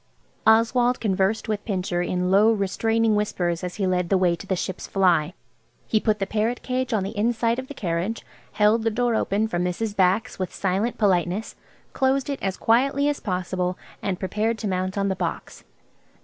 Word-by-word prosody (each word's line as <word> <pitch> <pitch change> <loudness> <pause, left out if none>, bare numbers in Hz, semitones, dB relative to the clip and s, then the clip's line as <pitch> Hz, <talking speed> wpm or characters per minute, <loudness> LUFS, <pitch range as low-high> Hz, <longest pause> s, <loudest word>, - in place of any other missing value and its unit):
Oswald 240 +3 +4
conversed 200 +1 0
with 210 -2 -2
Pincher 185 -4 -1
in 180 +1 -1
low, 210 +3 +5
restraining 225 +2 +1
whispers 180 -4 -1
as 180 -1 -4
he 200 - -1
led 180 -2 0
the 195 - +4
way 180 -2 +2
to 195 - -11
the 190 - 0
"Ship's" 185 +1 -4
fly. 180 -4 +2 0.5
He 215 - +2
put 215 -1 +1
the 195 - -1
parrot 220 +4 -1
cage 255 0 -2
on 215 -4 +1
the 200 +4 -5
inside 230 +2 +1
seat - - -2
of 260 - -6
the 285 - -9
carriage, 180 +3 -2 0.3
held 210 +2 +3
the 225 - +1
door 240 +2 0
open 215 0 +1
for 175 -5 -2
Mrs. 180 +4 -2
Bax 195 +5 +1
with 185 -2 -2
silent 200 +5 -1
politeness, 190 0 0 0.4
closed 270 +1 +1
it 280 - -5
as 190 -1 -2
quietly 275 +5 +2
as 290 - -2
possible, 180 -2 -2 0.2
and 190 -2 -2
prepared 215 +4 -1
to 220 - -4
mount 185 0 -2
on 200 0 +1
the 190 - 0
box. 175 -3 -5
205 Hz, 190 wpm, -24 LUFS, 185-225 Hz, 0.5 s, low